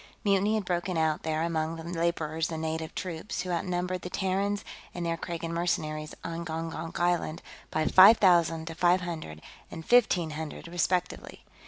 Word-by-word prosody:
Mutiny 200 +1 +2
had 215 -3 -1
broken 180 0 -1
out 160 -1 +1
there 160 0 -1
among 165 -1 -1
the 165 - -8
laborers 165 -1 -1
and 160 - -3
native 160 0 -3
troops, 180 +3 -4
who 185 - -4
outnumbered 180 +1 -2
the 180 - -6
Terrans 195 +2 -1 0.3
and 175 -1 -3
their 165 0 0
Kragan 165 0 -5
mercenaries 155 -3 -2
on 170 0 -4
Gongonk 165 0 -5
Island 175 -2 0 0.3
by 155 0 0
five 195 +4 +8
thousand 170 -4 +3
to 165 - -6
five 175 +2 +3
hundred 155 - -6 0.3
and 160 -1 -8
fifteen 190 -9 +3
hundred 155 +1 -6
respectively. 175 +1 -2
170 Hz, 165 wpm, -28 LUFS, 160-180 Hz, 0.3 s, five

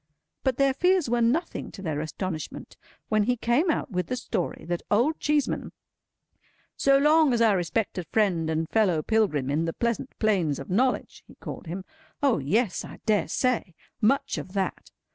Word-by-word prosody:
But 260 -2 +1
their 275 -1 +3
fears 360 -3 +2
were 240 0 +2
nothing 290 +10 0
to 195 - -9
their 155 -4 -2
astonishment 160 0 -5 0.3
when 215 -2 +2
he 250 +2 +1
came 240 +10 +2
out 290 - -1
with 180 -2 -1
the 255 - -2
story 245 - -3
that 175 0 -2
Old 245 +10 +2
Cheeseman, 295 -1 0 1.0
"so 275 0 +4
long 300 -3 +4
our 225 -3 +4
respected 180 -1 -2
friend 175 -6 +1
and 160 0 -1
fellow 180 -6 +2
pilgrim 170 - +1
in 155 +3 +1
the 165 - -2
pleasant 235 +2 -2
plains 185 -10 +1
of 140 - -8
knowledge," 250 +7 0
he - - -16
called - - -8
him—O 270 - -3
yes! 195 - 0
I - - -10
dare 215 -2 +2
say! 240 -9 0 0.3
Much 275 +6 +2
of 185 - -9
that! 195 -2 -2
220 Hz, 165 wpm, -26 LUFS, 175-260 Hz, 1.0 s, so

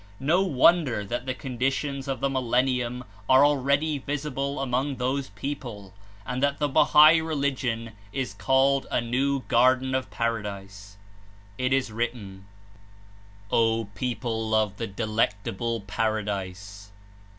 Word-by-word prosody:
No 160 +7 +2
wonder 150 - +3
that 120 +5 -4
the 130 - -2
conditions 135 +2 -2
of 135 -1 -3
the 140 - +1
millennium 125 -1 0 0.3
are 130 +2 +7
already 145 +1 +1
visible 140 -1 -3
among 135 +1 -1
those 130 +2 -2
peo 135 +9 -3
ple, 105 -9 -10 0.3
and 125 +2 -3
that 140 0 +1
the 145 - 0
Bahai 155 +2 +6
Religion 135 -7 -2 0.2
is 130 -4 -3
called 135 +5 +2
a - - +1
new 130 +4 0
Gar 125 +2 +4
den 130 0 -5
of 130 -5 -1
Paradise. 100 -3 -4 0.6
It 130 +1 0
is 135 -3 +1
written: 105 -4 -5 1.0
"O 115 -2 +2
People 115 -2 -2
of 105 -2 +1
the 115 - -3
Delectable 110 +1 -2
Paradise! 100 -1 -3
125 Hz, 130 wpm, -26 LUFS, 110-140 Hz, 1.0 s, are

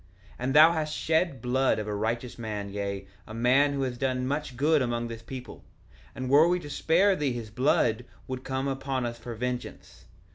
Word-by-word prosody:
1:13 - - -22
And 130 +2 -1
thou 155 +2 +9
hast 155 -2 -2
shed 165 +2 +2
the - - -12
blood 130 +2 +2
of 105 0 -4
a 105 - -2
righteous 115 +4 -3
man, 105 -3 -4
yea, 100 -1 -4 0.2
a 110 - -8
man 130 +5 +4
who 140 -1 -1
has 125 -2 -3
done 130 -1 0
much 140 -1 -3
good 150 +2 +3
among 120 -1 -1
this 115 -1 -7
people; 125 +2 -9 0.5
and 130 - -4
were 145 +5 +6
we 180 +1 +2
to 145 -4 -9
spare 185 +7 +3
thee 145 -6 -1
his 115 -3 -6
blood 120 -2 +1 0.2
would 130 0 -5
come 130 +1 -2
upon 135 -1 -2
us 120 0 -5
for 120 0 -7
vengeance. 125 +1 -5
130 Hz, 210 wpm, -28 LUFS, 115-145 Hz, 0.5 s, thou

